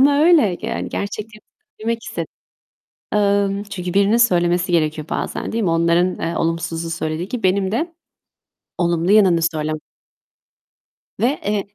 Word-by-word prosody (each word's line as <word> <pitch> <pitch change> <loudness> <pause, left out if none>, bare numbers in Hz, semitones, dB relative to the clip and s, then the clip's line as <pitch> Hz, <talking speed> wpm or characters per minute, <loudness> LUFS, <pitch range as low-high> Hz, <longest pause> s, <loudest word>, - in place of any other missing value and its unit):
Ama 285 +2 +5
öyle, 305 - +4
yani - - -3
gerçekleri 210 +1 -5 0.4
söylemek 230 +1 -2
istedim. - - -4 0.9
Emm, 200 -1 +2
çünkü 180 -3 -5
birinin 200 +3 +4
söylemesi 175 -5 +2
gerekiyor 155 -2 0
bazen, - - -3
değil 225 -2 0
mi? 170 - +2
Onların, 170 +2 +2
eee, 170 0 -2
olumsuzu 165 0 -2
söylediği 160 +2 -3
gibi 245 -2 -4
benim 190 +1 +1
de 330 +9 -2 0.8
olumlu 170 +1 +1
yanını 190 -6 +5
söylemem 155 0 -2 1.4
Ve, 255 +6 +1
eee, 205 -1 0
190 Hz, 135 wpm, -20 LUFS, 170-215 Hz, 1.4 s, Ama